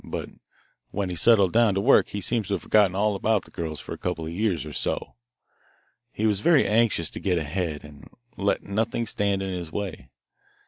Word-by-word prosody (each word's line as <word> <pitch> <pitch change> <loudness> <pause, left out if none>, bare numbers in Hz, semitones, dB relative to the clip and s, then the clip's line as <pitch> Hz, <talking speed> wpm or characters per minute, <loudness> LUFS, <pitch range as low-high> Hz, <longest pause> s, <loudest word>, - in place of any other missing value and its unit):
But - - -6 0.6
when 100 -2 -3
he - - -4
settled 100 +1 +4
down 115 -3 +4
to - - +1
work 100 - +5
he 100 - -4
seems 110 0 -1
to 100 - 0
have 90 - -6
forgotten 100 -4 +3
all 105 +2 +2
about 105 -1 0
the - - -18
girls 80 -4 -5
for - - -7
a - - -9
couple 85 -3 -3
of 80 - -5
years 90 -5 -1
or 75 - -8
so. - - -3 1.0
He 110 - -2
was 105 -3 +2
very 155 +4 +4
anxious 110 -6 +2
to - - -6
get 90 -3 0
ahead, 80 0 -3
and 75 -1 -14 0.3
let 100 0 0
nothing 115 +3 -1
stand 100 -2 0
in 95 -1 -3
his 85 -3 -5
way. 100 -4 -5
100 Hz, 210 wpm, -25 LUFS, 85-105 Hz, 1.0 s, work